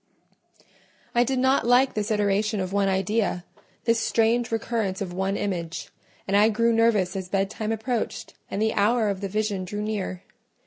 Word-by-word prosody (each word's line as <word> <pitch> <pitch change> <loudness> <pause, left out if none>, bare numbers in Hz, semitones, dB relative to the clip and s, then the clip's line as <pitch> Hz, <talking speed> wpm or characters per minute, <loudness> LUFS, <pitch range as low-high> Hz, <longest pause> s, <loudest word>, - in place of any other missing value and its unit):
I 240 - +4
did 265 +2 -1
not 260 -1 +2
like 255 +2 +4
this 210 0 -2
iteration 210 0 +1
of 185 0 -3
one 200 -1 +2
idea—this 200 +3 -1
strange 230 +1 +1
recurrence 225 -4 -1
of 185 -3 -4
one 190 +2 -1
image, 175 -5 -4 0.4
and 195 - +1
I 210 +2 +6
grew 230 +1 +2
nervous 215 -5 +2
as 190 -1 -4
bedtime 200 +3 -1
approached 225 +1 -3 0.2
and - - -3
the 220 +1 +1
hour 215 +1 +2
of 195 -1 -3
the 195 - -3
vision 210 -1 -1
drew 205 +3 -4
near. 200 -4 -3
210 Hz, 165 wpm, -25 LUFS, 195-230 Hz, 0.4 s, I